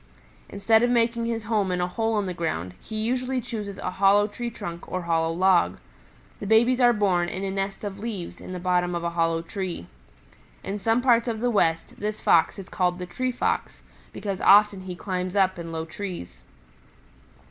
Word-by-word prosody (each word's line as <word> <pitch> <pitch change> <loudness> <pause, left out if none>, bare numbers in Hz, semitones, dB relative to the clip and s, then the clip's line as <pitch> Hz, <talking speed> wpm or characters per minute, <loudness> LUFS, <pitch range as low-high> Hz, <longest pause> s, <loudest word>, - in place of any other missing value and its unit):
Instead 220 +3 +3
of 245 - +3
making 235 -1 +1
his 230 -1 -2
home 210 -4 0
in 180 - -1
a 180 - +1
hole 225 +4 -1
in 205 - 0
the 185 - -3
ground, 90 - -3
he 220 - -8
usually 250 +4 -1
chooses 210 -4 -5
a 185 - -3
hollow 200 +1 +6
tree 235 +3 -5
trunk 170 -6 -8
or 185 -1 -2
hollow 165 -1 +1
log. 185 +1 +3 0.6
The 205 - -5
babies 235 +4 +4
are 245 -1 +6
born 190 -6 +1
in 190 - -5
a 195 - -2
nest 195 +1 -3
of 200 -1 -5
leaves 205 -5 -6
in - - -8
the 180 - -4
bottom 180 -1 +1
of 170 - -3
a 170 - -1
hollow 165 -1 0
tree. 185 - -5 0.8
In 200 +1 -4
some 225 +4 +1
parts 235 -2 +4
of 225 -2 -2
the 245 +1 +1
West 165 -6 0
this 210 +1 -3
Fox 165 -1 +3
is 195 -2 -8
called 180 -1 0
the 180 - -5
Tree 255 +8 -2
Fox, 250 - -2 0.3
because 195 -2 -4
often 205 -1 +6
he 185 -1 -6
climbs 185 0 -3
up 190 -2 +2
in 165 -1 -6
low 160 0 -3
trees. 160 - -7
195 Hz, 200 wpm, -25 LUFS, 175-225 Hz, 0.8 s, hollow